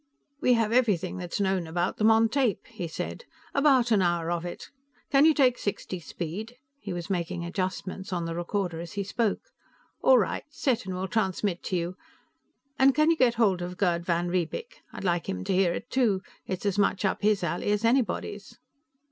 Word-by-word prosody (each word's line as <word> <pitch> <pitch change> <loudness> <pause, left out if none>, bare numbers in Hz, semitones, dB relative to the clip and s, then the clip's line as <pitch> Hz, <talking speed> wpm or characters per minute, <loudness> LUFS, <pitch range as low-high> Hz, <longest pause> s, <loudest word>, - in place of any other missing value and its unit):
"We 250 -4 +4
have 225 -2 +2
everything 205 -8 +2
that's 180 0 -4
known 190 -3 0
about 175 +3 -1
them 215 +1 +4
on 225 0 +5
tape," 250 -3 0
he 175 - -6
said. 320 - -5 0.3
"About 270 -4 +4
an 210 -3 +4
hour 175 -2 +1
of 175 0 -2
it. 175 - -7 0.4
Can 280 +1 +6
you 320 - +6
take 255 -3 +3
sixty 190 -2 -3
speed?" 175 - -6 0.2
He 200 - -6
was 175 +2 -4
making 175 -1 -2
adjustments 185 +1 -4
on 175 -2 -1
the 165 - -3
recorder 175 0 -2
as 170 +3 -7
he 200 -1 -2
spoke. 225 - -2 0.5
"All 260 - +6
right, 210 - 0
set 255 -8 -1
and 185 - -3
we'll 185 +1 -3
transmit 190 -3 -1
to 185 - -1
you. 175 +2 -2 0.8
And 265 0 +5
can 305 +2 +4
you - - +3
get 250 -6 +3
hold 200 -6 +2
of 180 +1 -5
Gerd 175 -3 +1
van 175 0 0
Riebeek? 185 - -3
I'd - - -8
like 175 -2 0
him 90 0 -3
to - - -1
hear 185 -2 +3
it 225 - -5
too; 215 -7 +2 0.2
it's 185 +1 -4
as 200 0 +1
much 200 0 +2
up 190 - 0
his 210 -2 +2
alley 175 +4 -1
as 210 +2 +1
anybody's." 245 +1 0
195 Hz, 200 wpm, -27 LUFS, 175-230 Hz, 0.8 s, Can